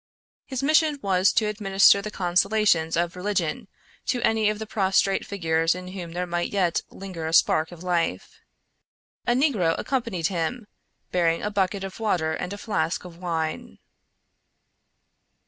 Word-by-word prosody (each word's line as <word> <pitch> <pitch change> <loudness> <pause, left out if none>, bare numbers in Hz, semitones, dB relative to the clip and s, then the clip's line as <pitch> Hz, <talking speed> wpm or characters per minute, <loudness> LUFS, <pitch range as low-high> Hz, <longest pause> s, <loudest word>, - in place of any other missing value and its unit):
His 265 -1 -4
mission 310 0 +3
was 190 -1 +3
to 220 - +2
administer 200 -2 +4
the 215 - -5
consolations 180 -3 +2
of 170 0 0
religion 180 -4 -2 0.4
to 250 - +1
any 220 -1 +3
of 210 - -2
the 220 - -5
prostrate 195 -2 +1
figures 165 -3 +1
in 180 0 -7
whom 180 -3 -7
there 180 +1 -2
might 175 0 -2
yet 185 -4 +1
linger 180 -5 -7
a 160 - -4
spark 160 -1 +3
of 175 0 -11
life. 170 - -2 0.9
A 240 - +4
negro 240 - +2
accompanied 230 -11 -2
him, 190 +6 -2 0.5
bearing 170 -2 +1
a 210 - -2
bucket 195 -1 0
of 195 +2 -7
water 175 -8 0
and 180 +3 -4
a 205 - -5
flask 185 -6 -2
of 170 -1 -11
wine. 165 -3 -3
185 Hz, 150 wpm, -25 LUFS, 170-210 Hz, 0.9 s, administer